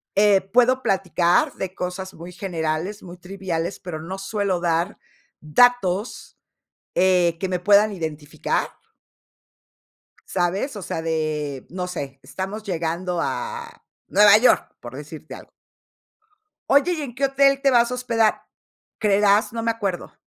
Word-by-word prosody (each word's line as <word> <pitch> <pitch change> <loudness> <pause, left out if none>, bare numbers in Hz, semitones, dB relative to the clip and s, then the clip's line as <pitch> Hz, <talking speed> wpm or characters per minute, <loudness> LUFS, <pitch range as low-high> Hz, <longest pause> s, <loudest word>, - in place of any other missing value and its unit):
eh, 200 -1 +5
puedo 250 +6 +2
platicar 180 -2 +2
de 190 -1 -6
cosas 185 +1 -5
muy 170 +2 -10
generales, 175 +1 -3
muy 175 0 -10
triviales, 180 -1 -4
pero 160 -4 -6
no 185 +4 -6
suelo 195 -2 -1
dar 170 +3 0 0.4
datos, 205 +4 +1 0.6
eh, 180 -2 +3
me 180 - -1
puedan 205 +3 +5
identificar 155 -4 -3 1.6
¿sabes? 190 +8 -1
O 205 - -6
sea, 160 - -4
de, 155 -4 -2
no 180 0 -4
sé, 140 -6 -6
estamos 195 +3 -6
llegando 175 -1 -2
a 470 - -5 0.2
Nueva 205 0 +7
York, 245 +3 +3
por 120 +1 -10
decirte 150 +2 -9
algo. - - -14 1.2
Oye, 285 +6 +4
¿y 320 - -4
en 270 -5 -6
qué 275 +3 0
hotel 275 0 +3
te 275 -1 +3
vas 240 -1 +4
a 250 - -1
hospedar? 230 -3 +1 0.6
'Creerás, 205 0 +3
no 230 - -3
me 230 - +2
acuerdo.' 200 -5 -4
190 Hz, 135 wpm, -23 LUFS, 170-220 Hz, 1.6 s, Nueva